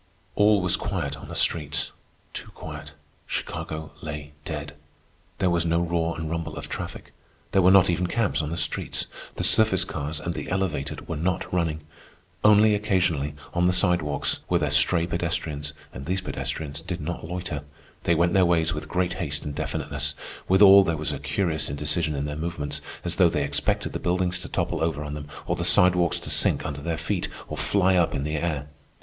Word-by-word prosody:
All 105 -1 +4
was 90 -1 +2
quiet 70 0 -3
on 70 - -11
the - - -8
streets—too 75 -3 -2
quiet. - - -8 0.3
Chicago 80 0 -4
lay 75 -1 -6
dead. 75 -1 -5 0.6
There 90 - +1
was 85 0 +2
no 85 0 +1
roar 85 -1 -1
and 80 0 -4
rumble 80 -1 -4
of - - -6
traffic. - - -7 0.4
There 95 - +4
were 90 - +6
not 95 0 +7
even 90 +1 0
cabs 105 -3 0
on 75 - -3
the 85 - -4
streets. - - -2 0.3
The - - -3
surface 110 -5 +5
cars 75 0 -3
and 85 +2 -3
the - - -6
elevated 90 -7 -2
were - - -3
not 90 +4 -2
running. 80 -3 0 0.6
Only 105 0 +6
occasionally, 90 - 0 0.2
on 90 0 +2
the 90 - +3
sidewalks, 90 -6 +2
were - - +3
there - - -1
stray 85 -2 +4
pedestrians, 85 -4 -2 0.2
and 70 +3 -8
these 95 +1 -1
pedestrians 80 -5 -4
did 90 -1 -5
not 80 +1 -5
loiter. 90 -4 -4 0.4
They 85 - +2
went 85 +1 +2
their 95 - +5
ways 85 -1 +2
with 75 0 -6
great 90 0 0
haste 75 -3 -3
and 75 - -4
definiteness, - - -2 0.3
withal 100 +1 +8
there 85 -3 -1
was 75 - -2
a - - -4
curious 85 -7 -1
indecision 75 +2 -1
in 70 +1 -2
their 75 0 -4
movements, 75 -3 -4 0.2
as - - -2
though - - +6
they - - -1
expected 70 0 0
the - - -3
buildings 90 0 0
to 90 - -9
topple - - -1
over 80 -3 -1
on 75 -1 -6
them 75 -1 -6 0.2
or - - 0
the 85 - -3
sidewalks 90 -1 +6
to - - -3
sink - - +4
under 70 -1 -4
their 80 +1 -2
feet 85 +3 -2 0.2
or - - -5
fly 95 -2 +2
up 85 -2 +2
in 70 - -2
the 75 +1 -2
air. 75 -3 -2
85 Hz, 190 wpm, -25 LUFS, 75-90 Hz, 0.6 s, withal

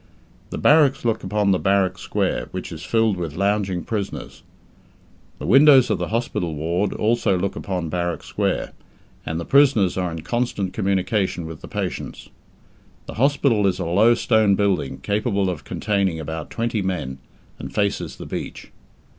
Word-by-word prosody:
The - - -5
barracks 145 -4 +4
look 115 -2 0
upon 100 +1 +1
the 95 - +2
Barrack 95 -1 +1
Square, - - -1
which - - -6
is - - -8
filled 110 -4 +1
with 85 -4 -4
lounging 100 -1 0
prisoners. 105 -3 -5 1.0
The - - -7
windows 135 -3 +6
of 105 - 0
the 90 - -2
hospital 105 -8 -2
ward 85 +6 -1
also 110 -3 +1
look 100 +2 -2
upon 90 -4 -3
Barrack 85 0 -2
Square, - - -2 0.6
and 80 +1 -2
the 85 - -5
prisoners 130 -11 +4
are 90 -2 -1
in 80 -1 -6
constant 120 -6 -2
communication 95 -2 0
with 80 -2 -8
the - - -9
patients. - - -5 0.8
The - - -8
hospital 135 -7 +3
is 95 - 0
a 90 - -3
low 105 +8 +4
stone 110 -4 +3
building, 95 -9 -1
capable 100 -2 0
of 75 -6 -8
containing 100 -5 -1
about 80 0 -5
twenty 115 -2 -2
men, 90 -9 -3 0.4
and - - -7
faces 100 -1 -1
the - - -9
beach. - - -7
100 Hz, 160 wpm, -22 LUFS, 90-110 Hz, 1.0 s, windows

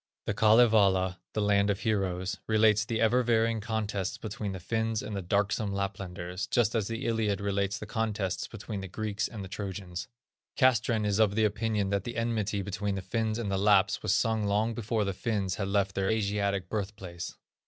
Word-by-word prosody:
The - - 0
Kalevala 105 -5 +4
(the 110 - 0
Land 100 0 +3
of 100 -1 0
Heroes) 95 -3 -1
relates 110 -1 +4
the 110 0 -2
ever 120 +3 +4
varying 115 -2 +2
contests 110 -1 -2
between 105 -3 -4
the 95 - -5
Finns 110 +3 -1
and 105 - -5
the 100 - -2
"darksome 100 +3 0
Laplanders", 95 -2 -4
just 115 -3 +2
as 110 -4 0
the 115 +3 -4
Iliad 110 -4 0
relates 100 -1 -1
the - - -7
contests 105 -3 -2
between 105 -2 -6
the 95 - -6
Greeks 105 +2 -2
and 105 -4 -7
the - - -6
Trojans. 95 -2 -5 0.5
Castrén 115 -4 +3
is 105 0 +1
of 105 -2 +4
the 110 0 +3
opinion 105 -1 0
that 100 -2 0
the 120 +1 -5
enmity 110 -3 -1
between 100 +1 -2
the 95 - -4
Finns 110 +1 -1
and 110 -4 -2
the 95 - 0
Lapps 100 -1 +4
was - - 0
sung 110 -1 +2
long 105 +3 +1
before 110 -1 -1
the 100 - -1
Finns 100 -3 -1
had 100 - -1
left 100 -1 +1
their 95 0 0
Asiatic 100 -3 0
birth 105 +1 -3
place. 85 -4 -7
105 Hz, 195 wpm, -29 LUFS, 95-110 Hz, 0.5 s, Kalevala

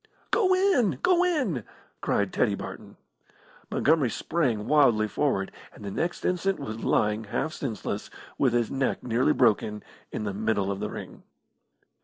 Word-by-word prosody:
"Go 385 -5 +3
in! 280 - +3
Go 360 -1 +4
in!" 260 - 0 0.4
cried - - 0
Teddy - - +2
Barton. - - -9 0.7
Montgomery 150 -4 +3
sprang 120 -5 -1
wildly 120 -8 +4
forward, 105 -5 0 0.2
and 105 - -10
the 100 - -4
next 170 - -2
instant 185 +2 0
was 115 -5 -6
lying 105 +1 +1
half 155 +9 -2
senseless, 110 - -4 0.3
with 130 -3 +2
his 120 -2 +1
neck 135 -1 -1
nearly 120 +1 +2
broken, 105 -3 +2 0.3
in - - -3
the 100 -2 -2
middle 100 -1 0
of 100 - -4
the 105 0 -3
ring. - - -8
125 Hz, 150 wpm, -27 LUFS, 105-170 Hz, 0.7 s, Go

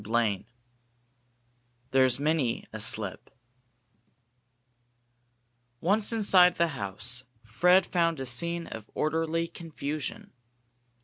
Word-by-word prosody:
CHAPTER 110 +3 0
IX 100 -4 -2 1.5
"THERES 130 -1 +3
MANY 145 -5 0
A 110 - -5
SLIP 105 -2 -1 0.9
" 120 -2 -46 1.5
Once 205 - +2
inside 195 -5 +5
the 170 0 +1
house, 125 0 -3 0.2
Fred 180 - +3
found 165 -3 0
a 135 - -4
scene 170 +7 0
of 110 -1 -9
orderly 165 +2 0
confusion. 155 -3 -5
150 Hz, 100 wpm, -28 LUFS, 120-170 Hz, 1.5 s, inside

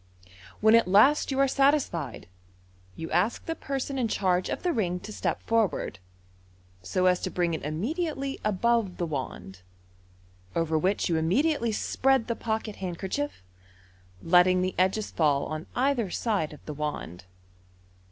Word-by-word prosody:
When 220 +1 +6
at 230 -3 +5
last 215 +11 +5
you 270 - -2
are 275 0 +4
satisfied, 265 - +1 0.7
you 165 - -7
ask 180 +8 +1
the 325 - -2
person 275 -2 -4
in 240 - +1
charge 185 -4 0
of - - -4
the 355 -2 +1
ring 180 -6 -1
to 215 - -8
step - - -2
forward, 220 - 0 0.8
so 185 - -1
as 180 -1 +4
to - - -3
bring 175 -2 0
it 160 - -3
immediately 275 - -3
above 215 -1 +1
the 175 - -1
wand, 130 - -6 0.9
over 165 -1 0
which 185 +6 +1
you 165 - +1
immediately 235 - +1
spread 265 +3 +1
the 235 - -2
pocket 220 -2 -3
handkerchief, 190 - -4 0.8
letting 180 +1 +5
the 185 - -1
edges 190 +3 +1
fall 145 -4 +2
on 155 +1 -5
either 250 -5 +1
side 200 -7 -1
of 150 - -14
the 150 - -5
wand. 145 - -5
195 Hz, 150 wpm, -27 LUFS, 165-245 Hz, 0.9 s, When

